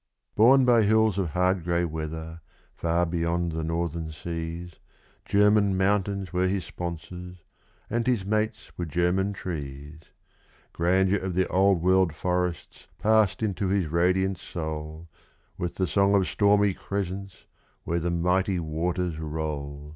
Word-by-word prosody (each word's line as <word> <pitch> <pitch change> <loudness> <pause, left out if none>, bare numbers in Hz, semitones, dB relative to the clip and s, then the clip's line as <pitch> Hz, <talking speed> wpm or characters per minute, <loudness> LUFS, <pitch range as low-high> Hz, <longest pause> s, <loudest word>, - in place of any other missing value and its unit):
Born 130 +4 +6
by 120 -2 +5
hills 110 -1 +3
of 90 -4 0
hard 90 +2 +1
grey 85 0 +1
weather, 80 +1 -6 0.3
far 85 +1 +1
beyond 85 0 -1
the 80 0 -3
northern 80 0 -2
seas, 85 +1 -6 0.5
German 100 -1 +3
mountains 100 0 0
were 90 +1 +2
his 95 -2 -1
sponsors, 90 0 -7 0.4
and 120 0 -1
his 120 -7 +1
mates 110 +1 -1
were 85 - -1
German 90 +5 +1
trees; 75 -5 -6 0.7
Grandeur 95 +3 +2
of 95 -2 -4
the 95 0 +2
old 95 -2 +3
world 95 -3 +3
forests 90 0 -3
passed 110 -1 +2
into 100 -2 -1
his 95 -1 +1
radiant 90 +3 +1
soul, 80 0 -6 0.5
With 85 0 -3
the 95 - 0
song 100 +1 +3
of 95 -2 +3
stormy 100 -1 +3
crescents 100 0 -5 0.4
where 85 +1 -1
the 85 +1 -1
mighty 90 +3 +1
waters 85 +1 -2
roll. 75 -2 -5
90 Hz, 135 wpm, -26 LUFS, 85-100 Hz, 0.7 s, Born